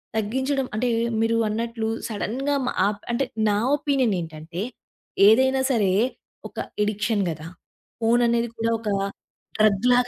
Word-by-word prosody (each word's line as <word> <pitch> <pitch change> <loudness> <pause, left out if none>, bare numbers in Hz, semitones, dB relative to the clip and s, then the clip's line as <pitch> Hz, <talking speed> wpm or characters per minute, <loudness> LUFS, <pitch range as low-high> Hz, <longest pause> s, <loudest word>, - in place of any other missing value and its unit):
తగ్గించడం 260 +5 0
అంటే 245 +3 0 0.3
మీరు 230 0 +2
అన్నట్లు 225 0 -2 0.2
సడెన్‌గా 250 +6 -2
మా - - 0 0.2
ఆప్ 205 0 -3
అంటే 270 +3 +1 0.2
నా 205 - +2 0.2
ఒపీనియన్ 275 -7 +1
ఏంటంటే 165 +2 -6 0.7
ఏదైనా 265 +4 +4
సరే 205 -6 +2 0.6
ఒక - - -25 0.3
ఎడిక్షన్ 210 0 0
గదా! 155 0 -7 0.5
ఫోను 235 +2 +3
అనేది 235 0 +1
కూడా 230 0 0
ఒక 220 -2 -4 0.7
డ్రగ్ 215 +1 +3
లాగ 245 0 +3
225 Hz, 130 wpm, -24 LUFS, 210-250 Hz, 0.7 s, ఏదైనా